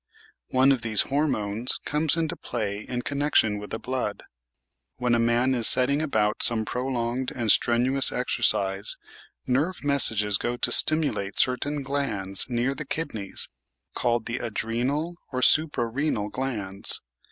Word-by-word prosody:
One 130 Hz, +2 st, +4 dB
of 130 Hz, -3 st, +1 dB
these 110 Hz, -3 st, +2 dB
"hormones" 125 Hz, -6 st, +1 dB
comes 150 Hz, +2 st, +2 dB
into 165 Hz, +1 st, -1 dB
play 105 Hz, -9 st, -4 dB
in 125 Hz, +2 st, -4 dB
connection 140 Hz, -7 st, +1 dB
with 105 Hz, -, -9 dB
the 110 Hz, -, -3 dB
blood. 125 Hz, -4 st, -4 dB, 0.7 s
When 125 Hz, -1 st, 0 dB
a 120 Hz, -, +3 dB
man 120 Hz, +3 st, +2 dB
is 120 Hz, -3 st, +2 dB
setting 140 Hz, +3 st, +3 dB
about 110 Hz, -8 st, 0 dB
some 110 Hz, -2 st, +3 dB
prolonged 125 Hz, +1 st, -2 dB
and 115 Hz, -4 st, +1 dB
strenuous 125 Hz, +3 st, +3 dB
exercise, 95 Hz, 0 st, 0 dB, 0.5 s
nerve 150 Hz, +9 st, -1 dB
messages 110 Hz, -8 st, +2 dB
go 120 Hz, 0 st, -2 dB
to 120 Hz, -, 0 dB
stimulate 145 Hz, -10 st, +1 dB
certain 140 Hz, +3 st, +1 dB
glands 110 Hz, -9 st, -1 dB
near 120 Hz, +2 st, 0 dB
the 155 Hz, -, -6 dB
kidneys 110 Hz, -10 st, -1 dB, 0.5 s
called 120 Hz, -2 st, 0 dB
the 120 Hz, +2 st, -3 dB
adrenal 125 Hz, +9 st, -2 dB
or 130 Hz, -1 st, -2 dB
suprarenal 130 Hz, -6 st, +1 dB
glands. 105 Hz, -6 st, -2 dB
125 Hz, 135 wpm, -25 LUFS, 110-140 Hz, 0.7 s, One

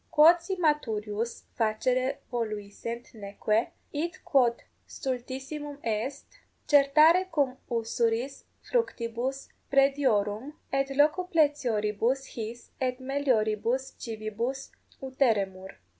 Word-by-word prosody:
Quod 330 Hz, +3 st, +7 dB
si 380 Hz, +3 st, -3 dB
maturius 230 Hz, -, -1 dB
facere 255 Hz, +4 st, 0 dB
voluissent 230 Hz, 0 st, -4 dB
neque, 215 Hz, +1 st, -1 dB, 0.3 s
id 335 Hz, +5 st, -2 dB
quod 245 Hz, -4 st, +3 dB, 0.2 s
stultissimum 270 Hz, +3 st, -5 dB
est, 230 Hz, +5 st, -2 dB, 0.4 s
certare 305 Hz, +6 st, +6 dB
cum 280 Hz, -5 st, +1 dB
usuris 230 Hz, +2 st, -1 dB, 0.2 s
fructibus 260 Hz, -, -2 dB, 0.2 s
praediorum, 270 Hz, -3 st, +2 dB, 0.2 s
et 275 Hz, 0 st, +2 dB
locupletioribus 275 Hz, -, +2 dB
his 230 Hz, +1 st, -7 dB
et 255 Hz, 0 st, 0 dB
melioribus 260 Hz, -2 st, 0 dB
civibus 230 Hz, +4 st, -4 dB, 0.3 s
uteremur. 205 Hz, -8 st, 0 dB
255 Hz, 85 wpm, -28 LUFS, 225-280 Hz, 0.4 s, Quod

